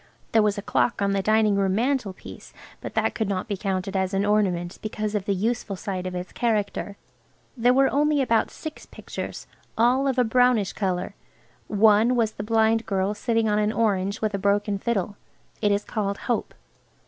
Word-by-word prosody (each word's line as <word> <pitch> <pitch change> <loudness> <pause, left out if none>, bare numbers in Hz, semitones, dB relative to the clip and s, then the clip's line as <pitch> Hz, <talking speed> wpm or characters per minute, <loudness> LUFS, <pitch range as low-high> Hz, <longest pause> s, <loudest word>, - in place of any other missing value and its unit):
There 225 - +5
was 210 -1 +1
a 205 - -4
clock 235 - +1
on 200 0 +1
the 195 0 +1
dining 215 0 +3
room 195 -1 +1
mantelpiece, 235 -4 -3 0.3
but - - -7
that - - +1
could 220 -3 -2
not 190 +1 -2
be 205 - -2
counted 195 0 -3
as 190 0 0
an 195 +1 +1
ornament 190 -4 0
because 215 -1 -3
of 205 -3 -2
the 200 - 0
useful 220 +1 -2
side 185 -1 -4
of 180 - -5
its 180 0 -5
character 205 -3 -1 0.6
There 245 0 +3
were 270 0 +5
only 295 +1 +2
about 230 -4 +2
six 315 -1 -9
pictures–all 250 +4 -2
of 265 -1 0
a 250 - +4
brownish 245 -3 +2
colour. 185 -3 -2 0.5
One 215 +3 +4
was 225 -3 +1
the 205 - -7
blind 225 +1 +2
girl 195 0 0
sitting 225 +1 0
on 210 0 +2
an 210 0 +1
orange 200 -3 0
with 215 -1 0
a 200 - -1
broken 200 0 +1
fiddle. 205 -2 -2 0.4
It 205 -2 +2
is 200 +1 +1
called 200 -2 -2
Hope. 240 - -2
210 Hz, 185 wpm, -24 LUFS, 195-230 Hz, 0.6 s, There